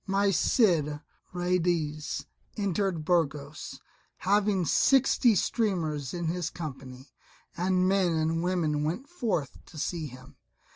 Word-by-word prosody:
My 195 +1 +2
Cid 160 - +2 0.3
Ruydiez 175 -4 -1 0.3
entered 195 -5 -1
Burgos, 150 -4 -1 0.4
having 200 -1 +2
sixty 255 - +4
streamers 165 - 0
in 175 -1 -4
his 170 0 -1
company. 135 -4 -8 0.4
And 185 +1 +1
men 190 -3 +2
and 160 +1 0
women 165 -5 0
went 180 - -2
forth 215 - -3
to 165 - -13
see 160 +1 -2
him. 130 +1 -14
170 Hz, 110 wpm, -28 LUFS, 150-195 Hz, 0.4 s, sixty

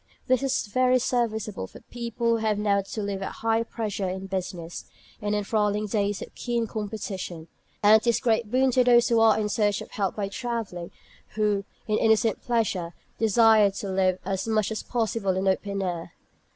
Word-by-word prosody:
This 255 0 +2
is 270 -2 0
very 255 +4 +3
serviceable 220 - -1
for - - -13
people 235 -1 -2
who - - +4
have 220 -2 0
now 205 -1 +2
to 205 +2 -5
live 200 -1 -3
at 195 - -4
high 225 0 +3
pressure 210 -4 -3
in 190 +1 -5
business, 180 -3 -5 0.4
in 210 0 -1
the - - +2
enthralling 210 0 0
days 205 -1 -1
of - - -12
keen 235 -1 -1
competition. 200 -6 -5 0.3
And 215 +1 +7
it 240 - -6
is 235 - +4
a - - -6
great 230 -2 +1
boon 260 +2 +3
to 250 +1 +4
those 240 -1 +5
who 230 -1 +4
are 225 -1 +5
in 210 - 0
search 205 -1 +1
of - - -9
health 195 -3 -1
by 205 -2 -2
travelling, 205 -5 -4
or - - -16 0.5
who, 210 -2 +1 0.2
in 215 -1 +1
innocent 220 -1 +2
pleasure, 195 -8 -1 0.2
desire 220 -1 +5
to 195 0 -6
live 185 -1 +2
as 195 +2 -2
much 215 -1 +1
as 220 - -3
possible 220 -5 -1
in 190 - 0
the 190 - +4
open 200 0 -3
air. 175 -2 -4
210 Hz, 200 wpm, -26 LUFS, 195-230 Hz, 0.5 s, And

